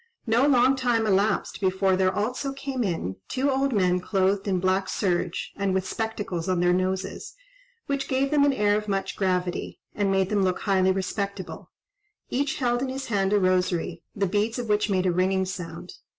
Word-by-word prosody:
No 240 +4 +3
long 260 -1 +4
time 240 -4 +1
elapsed 205 +1 +1
before 190 0 +2
there 185 0 +2
also 250 +7 -2
came 270 -2 -3
in 165 - -2
two 275 +2 +1
old 270 +1 +1
men 180 -5 +2
clothed 195 +1 0
in 185 -2 +1
black 190 +1 +1
serge, 180 -2 -1
and 195 -1 0
with 190 0 -1
spectacles 205 -6 -3
on 185 -1 +1
their 175 0 +3
noses, 185 +1 -2 0.5
which 280 -1 -2
gave 270 +1 0
them 295 -2 +4
an 285 - +4
air 205 -5 +2
of 210 0 -2
much 195 -1 -2
gravity, 180 -2 -1
and 205 -1 0
made 190 -1 +2
them 210 -2 +1
look 185 -1 0
highly 190 -2 +3
respectable: 195 0 -4 0.6
each 275 +2 0
held 245 -2 0
in 265 - -1
his 265 0 -5
hand 195 -3 +1
a 210 - +4
rosary, 180 -2 0
the 200 - +1
beads 210 +5 0
of 240 -3 -4
which 210 +1 +2
made 185 -2 +1
a 185 - +3
ringing 190 +2 +1
sound. 180 -2 -7
195 Hz, 190 wpm, -25 LUFS, 185-235 Hz, 0.6 s, long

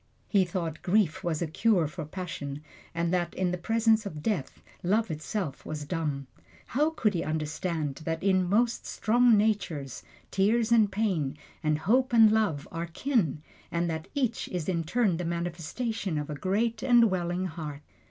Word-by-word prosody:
He 195 -3 +3
thought 170 -3 -4
grief 185 -4 +2
was 170 -1 -1
a - - -2
cure 185 +2 +2
for 150 - -6
passion, 150 -4 -6 0.3
and 170 +1 0
that 175 -2 0
in 185 -1 0
the 180 - -1
presence 225 +2 +3
of 155 -8 -7
death, 200 -11 -2 0.2
love 205 +2 +1
itself 155 0 -4
was 150 -1 -5
dumb. 145 -3 -2 0.4
How 295 +5 +1
could 225 -10 0
he 170 -2 -1
understand 155 -1 -2
that, 165 +1 -3
in 185 -2 +3
most 230 +4 +1
strong 235 0 +4
natures, 195 - -1 0.3
tears 220 +4 +2
and 220 -3 +5
pain, 180 -9 0 0.2
and 155 -2 +1
hope 250 +9 +2
and 225 -2 +7
love 210 -10 +1
are 165 +1 -3
kin, 170 - 0 0.3
and 170 0 0
that 160 0 -4
each 250 -5 0
is 175 -4 -4
in 170 -3 0
turn 200 -1 +2
the 180 - -3
manifestation 175 +3 -3
of 150 0 -3
a - - -3
great 220 +7 0
and 240 -4 +5
welling 180 0 -1
heart! 155 -4 -6
180 Hz, 170 wpm, -28 LUFS, 160-220 Hz, 0.4 s, and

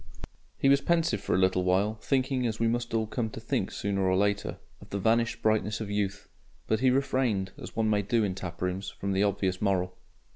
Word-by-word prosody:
He - - +2
was 140 0 +5
pensive 165 - +1
for - - 0
a - - +3
little 95 -1 +3
while, 95 +4 +2
thinking, 130 -2 +1
as 110 -1 -3
we 115 - +2
must 120 +1 -1
all 110 -1 +1
come 110 +1 -2
to - - -8
think - - -1
sooner 100 -1 -2
or 95 -1 +2
later, 100 +1 0 0.2
of - - -14
the 100 - -3
vanished 115 +4 +1
brightness 110 -1 +1
of 105 -2 -4
youth. 100 0 -2 0.4
But 110 - +1
he 130 +1 +4
refrained, 125 -7 +1
as - - -9
one 110 -1 +1
may 105 -1 +3
do 110 +3 +1
in 100 -3 0
taprooms, 90 +1 -4
from 100 - -4
the 95 0 +1
obvious 95 -2 0
moral. 90 -3 0
105 Hz, 215 wpm, -28 LUFS, 95-115 Hz, 0.4 s, was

